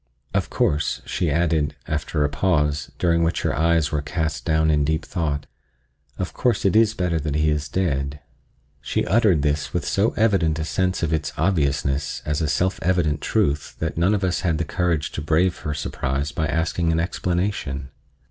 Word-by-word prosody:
Of - - 0
course," 75 +1 0
she 85 - -1
added, 80 -2 +1
after 75 0 -1
a - - +3
pause, 75 -1 0
during 85 -1 +2
which 85 0 0
her - - 0
eyes 80 -1 +2
were 75 -2 0
cast 75 -3 -3
down 80 0 +3
in 75 -1 +2
deep 80 +1 0
thought, 75 -4 -2 0.7
"of - - -3
course 125 -4 0
it 95 - +3
is 110 -1 +4
better 90 -4 0
that 75 -1 -2
he 75 0 +2
is 75 -1 -2
dead." 70 -5 -1 0.6
She - - -1
uttered 100 - +3
this 75 0 -1
with 90 - 0
so 100 +3 +1
evident 95 -9 +2
a 80 - -2
sense 90 +1 0
of 80 -1 0
its 80 -2 -1
obviousness 70 -4 0
as 75 +2 -1
a 80 - +1
self 90 +6 0
evident 85 -4 +1
truth 75 +1 0
that 80 0 -3
none 90 +6 +3
of 100 - -2
us 90 -2 +1
had 85 -3 0
the 85 - -1
courage 85 -2 0
to - - -4
brave 80 +4 +1
her 75 - -3
surprise 70 0 -2
by 80 - -1
asking 80 +2 0
an 80 - +1
explanation. 85 -6 -2
80 Hz, 185 wpm, -23 LUFS, 75-90 Hz, 0.7 s, is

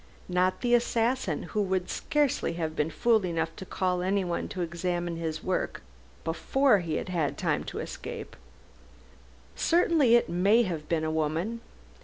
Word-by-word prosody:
Not 180 +1 +1
the 245 -1 +1
assassin, 235 - +1
who 210 - -2
would 185 -2 0
scarcely 295 - 0
have 160 -2 -3
been 150 0 0
fool 220 +7 +2
enough 165 -2 -2
to 190 - -8
call 180 -1 0
anyone 185 -2 0
to 185 -3 -3
examine 175 0 -2
his 160 -2 -4
work 185 - -2 0.4
before 240 +8 +2
he 165 -3 -3
had 170 -6 -1
time - - 0
to - - -6
escape. - - -6 1.2
Certainly 325 -8 +4
it 240 - +3
may 200 +7 +4
have 165 -7 -4
been 165 -2 +1
a 155 - 0
woman! 160 +9 -1
180 Hz, 150 wpm, -28 LUFS, 165-225 Hz, 1.2 s, Certainly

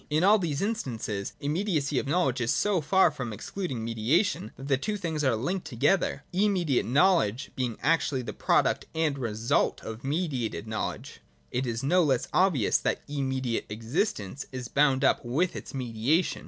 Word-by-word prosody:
In 155 +3 +2
all 210 +3 +6
these 160 -3 -1
instances, 120 - -3
immediacy 150 -3 0
of - - -4
know 175 +5 +2
ledge 130 -1 -1
is 120 - +1
so 205 -5 +1
far 180 +2 +4
from 125 -6 -5
excluding 125 - -4
mediation, 115 - +1
that 135 +2 -8
the 140 - +3
two 210 +10 -2
things 160 -5 -2
are 130 -4 +3
linked 175 - -2
together, 145 +10 +1
— - - -36
immediate 180 -8 +1
knowledge 135 - +2
being 125 -4 -2
actually 150 -5 +1
the - - -5
product - - +1
and 155 -3 0
result 115 -1 0
of 110 +1 -7
mediated 135 - -2
know 110 0 -1
ledge. - - -9 0.3
It 125 +1 -1
is 115 +1 -3
no 180 +7 +4
less 135 -5 +1
obvious 180 - +3
that - - -1
immediate 130 -4 -2
existence 115 - -2
is 125 -3 -6
bound 140 -2 +3
up - - +3
with 155 +9 0
its - - -7
mediation. 130 +6 0
140 Hz, 175 wpm, -28 LUFS, 120-175 Hz, 0.3 s, all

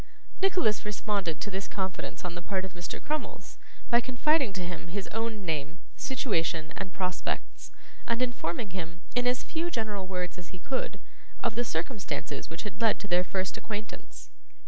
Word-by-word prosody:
Nicholas 360 - +4
responded 200 -5 0
to 205 - -2
this 195 +1 -1
confidence 190 -2 -2
on 175 - -1
the 175 - -4
part 190 0 0
of 190 - -7
Mr. 175 -2 -4
Crummles, 305 0 -3 0.3
by 235 0 +8
confiding 260 +1 +4
to 185 -2 -1
him 175 0 -4
his 190 +3 -2
own 225 -2 -1
name, 155 0 0 0.2
situation, 165 - +1
and 190 -1 -3
prospects, 180 -1 -1 0.4
and 235 0 +3
informing 235 -5 0
him, 175 -1 -4
in 245 0 +4
as 250 0 +3
few 335 +1 0
general 215 - -1
words 180 -1 -1
as 175 - -8
he 185 - -8
could, 260 +9 -1 0.4
of - - +3
the 240 +2 +2
circumstances 165 - -2
which 165 +3 -4
had 210 +2 -5
led 225 -2 +6
to 205 - -5
their 180 -1 +5
first 185 0 0
acquaintance. 215 -1 -5
195 Hz, 170 wpm, -31 LUFS, 175-235 Hz, 0.4 s, by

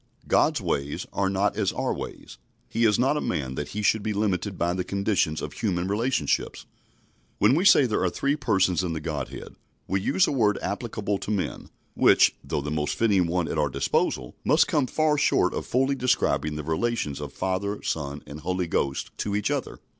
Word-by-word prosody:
God's - - +3
ways 70 +1 -2
are 100 -1 +1
not 100 +2 0
as 100 -3 0
our - - -1
ways. 65 - -8 0.3
He 115 - +1
is 105 -2 +4
not 135 +4 +2
a - - -1
man 65 -6 -2
that - - -4
He 105 - -4
should 110 +1 +3
be 105 +1 -2
limited 100 -2 -1
by 85 0 0
the 90 0 -2
conditions 100 -5 0
of - - -5
human 90 -4 -1
relationships. 115 +6 -1 0.7
When 105 +5 +4
we 170 +7 +2
say 145 - +7
there 110 -5 0
are 95 - +2
three 140 +10 0
Persons 95 - +1
in 85 -2 -2
the 80 - -3
Godhead, 75 - -5 0.3
we 95 0 0
use 180 - +3
a - - -1
word 110 -7 +2
applicable 105 -2 -3
to - - -6
men, 100 -3 -3 0.2
which, - - +5
though - - -2
the 75 +1 -4
most 75 -1 -1
fitting 100 -6 +2
one 85 0 0
at 80 - -2
our 75 -1 +2
disposal, 65 -1 -1
must - - +4
come 145 -4 +1
far 155 +2 +1
short - - +2
of - - -4
fully 135 +2 +2
describing 125 - +1
the 75 - -4
relations 80 -2 -1
of 70 -1 -6
Father, 100 +2 -2
Son, 70 -2 -3
and 70 +3 -9
Holy 90 +3 -1
Ghost 70 -4 -2
to 100 -1 -1
each 105 +6 0
other. 140 -3 -3
100 Hz, 200 wpm, -26 LUFS, 80-115 Hz, 0.7 s, say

